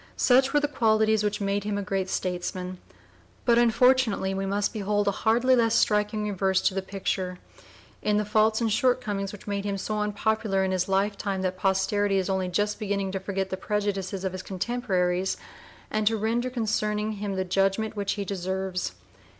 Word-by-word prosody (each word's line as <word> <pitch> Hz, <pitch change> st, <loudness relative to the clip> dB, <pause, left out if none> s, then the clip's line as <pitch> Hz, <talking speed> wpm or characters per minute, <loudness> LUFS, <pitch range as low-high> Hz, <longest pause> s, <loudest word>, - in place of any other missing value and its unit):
Such 260 Hz, +1 st, +4 dB
were 295 Hz, -, +4 dB
the 290 Hz, -, 0 dB
qualities 220 Hz, -5 st, +2 dB
which 210 Hz, 0 st, -1 dB
made 200 Hz, 0 st, -1 dB
him 205 Hz, 0 st, -2 dB
a 205 Hz, -, -2 dB
great 195 Hz, 0 st, -2 dB
statesman; 180 Hz, 0 st, -3 dB, 0.7 s
but 235 Hz, -1 st, +5 dB
unfortunately 240 Hz, -4 st, +3 dB
we 195 Hz, 0 st, -2 dB
must 200 Hz, +3 st, 0 dB
behold 205 Hz, -1 st, 0 dB
a -, -, +4 dB
hardly 235 Hz, +6 st, +3 dB
less 230 Hz, -2 st, +3 dB
striking 210 Hz, 0 st, +2 dB
reverse 190 Hz, -1 st, +1 dB
to -, -, +2 dB
the 195 Hz, -, -1 dB
picture, 190 Hz, -1 st, -3 dB, 0.6 s
in 210 Hz, 0 st, +1 dB
the 210 Hz, -, 0 dB
faults 215 Hz, +2 st, +2 dB
and 225 Hz, -1 st, +1 dB
shortcomings 215 Hz, -5 st, 0 dB
which 205 Hz, -, -11 dB
made 200 Hz, -1 st, -2 dB
him 200 Hz, -1 st, -2 dB
so 210 Hz, +2 st, -3 dB
unpopular 210 Hz, -1 st, 0 dB
in 190 Hz, -, 0 dB
his 185 Hz, 0 st, 0 dB
lifetime 195 Hz, 0 st, 0 dB
that 185 Hz, 0 st, -1 dB
posterity 195 Hz, +1 st, +1 dB
is 190 Hz, 0 st, 0 dB
only 190 Hz, -1 st, 0 dB
just 205 Hz, +4 st, -1 dB
beginning 200 Hz, -2 st, -1 dB
to 195 Hz, -, -2 dB
forget 190 Hz, 0 st, -3 dB
the 190 Hz, -, -2 dB
prejudices 195 Hz, -2 st, -2 dB
of 190 Hz, -, -1 dB
his 185 Hz, 0 st, -5 dB
contemporaries 190 Hz, -3 st, -1 dB, 0.5 s
and 215 Hz, -1 st, 0 dB
to 225 Hz, 0 st, +3 dB
render 230 Hz, +4 st, 0 dB
concerning 215 Hz, -3 st, -1 dB
him 205 Hz, -2 st, -4 dB
the 190 Hz, 0 st, -1 dB
judgment 195 Hz, +4 st, +1 dB
which 200 Hz, -1 st, -1 dB
he 200 Hz, -1 st, -4 dB
deserves. 190 Hz, -1 st, -3 dB
205 Hz, 185 wpm, -26 LUFS, 190-215 Hz, 0.7 s, but